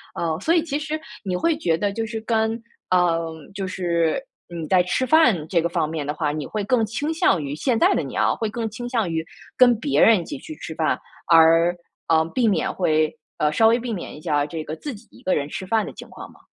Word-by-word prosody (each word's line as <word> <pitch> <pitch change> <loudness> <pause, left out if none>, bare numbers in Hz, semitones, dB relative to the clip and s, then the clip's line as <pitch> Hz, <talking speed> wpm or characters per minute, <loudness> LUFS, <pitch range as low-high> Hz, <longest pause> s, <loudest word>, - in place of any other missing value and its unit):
呃， 160 -2 -1
所 325 - +2
以 330 - +3
其 290 -4 -2
实 310 +1 -3 0.2
你 185 -3 -2
会 330 - +1
觉 165 - +1
得 200 +3 -1
就 225 +2 -2
是 225 0 -4
跟 225 0 0 0.3
呃， 170 -2 +2 0.2
就 195 -1 -4
是 170 -3 0 0.3
你 170 -2 -6
在 185 +1 +4
吃 180 +8 0
饭 250 - +4
这 170 0 +2
个 170 - -1
方 165 - 0
面 155 -2 -3
的 145 - -2
话， 150 -2 -1
你 150 -1 -4
会 215 - -3
更 230 +2 +2
倾 290 +9 -3
向 255 - +2
于 140 0 -4
现 240 - 0
在 375 +3 +4
的 - - +1
你 - - -6
啊， - - +2
会 220 - -2
更 225 +1 -3
倾 240 +3 -6
向 225 -7 0
于 160 -1 -2 0.3
跟 245 -3 +5
别 285 +3 +1
人 225 -3 +6
一 170 - -6
起 295 - -6
去 315 +3 -9
吃 - - -7
饭， - - 0 0.3
而， 165 +1 +6 0.3
呃， 160 -1 +3
避 250 -3 +2
免 200 - 0
会 155 -4 +1 0.2
呃， 150 0 +1
稍 220 +8 +4
微 230 +2 +4
避 240 -1 -4
免 185 - -6
一 - - -12
下 150 -3 +1
这 160 +1 -5
个 155 - -6
自 290 - -6
己 220 +2 -16
一 - - -17
个 185 - +1
人 140 -1 -1
吃 185 - -6
饭 220 +3 +1
的 - - -8
情 - - -11
况 - - -10
吗？ - - -21
190 Hz, 270 characters per minute, -23 LUFS, 165-235 Hz, 0.3 s, 人